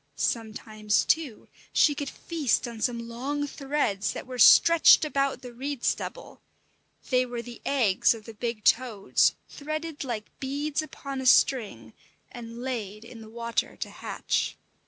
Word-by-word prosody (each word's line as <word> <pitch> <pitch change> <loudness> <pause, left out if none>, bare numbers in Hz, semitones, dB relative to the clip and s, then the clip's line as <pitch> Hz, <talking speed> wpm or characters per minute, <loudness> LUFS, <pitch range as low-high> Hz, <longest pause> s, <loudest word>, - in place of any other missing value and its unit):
Sometimes, 215 +1 -1
too, 300 -9 -1 0.3
she 295 - +4
could 285 -1 -4
feast 310 -8 -1
on 230 -2 -8
some 235 -1 -1
long 275 +5 -3
threads 275 -8 -2
that - - -7
were 250 -1 -8
stretched 335 +6 +7
about 275 -3 -1
the 245 -1 -9
reed 270 +1 -5
stubble; - - -3 0.7
they 255 0 +4
were 240 -1 -5
the 240 0 -11
eggs 230 -6 +3
of 220 -2 -12
the 225 - -9
big 230 0 -4
toads, 225 -5 +2
threaded 310 +1 -5
like 230 -5 -5
beads 285 +3 -2
upon 275 -3 -7
a 260 - -1
string, 245 -3 +3 0.4
and 235 0 -9
laid 220 -4 -5
in 230 -1 -11
the 220 - -12
water 235 0 -3
to - - -5
hatch. - - -2
245 Hz, 150 wpm, -27 LUFS, 230-280 Hz, 0.7 s, stretched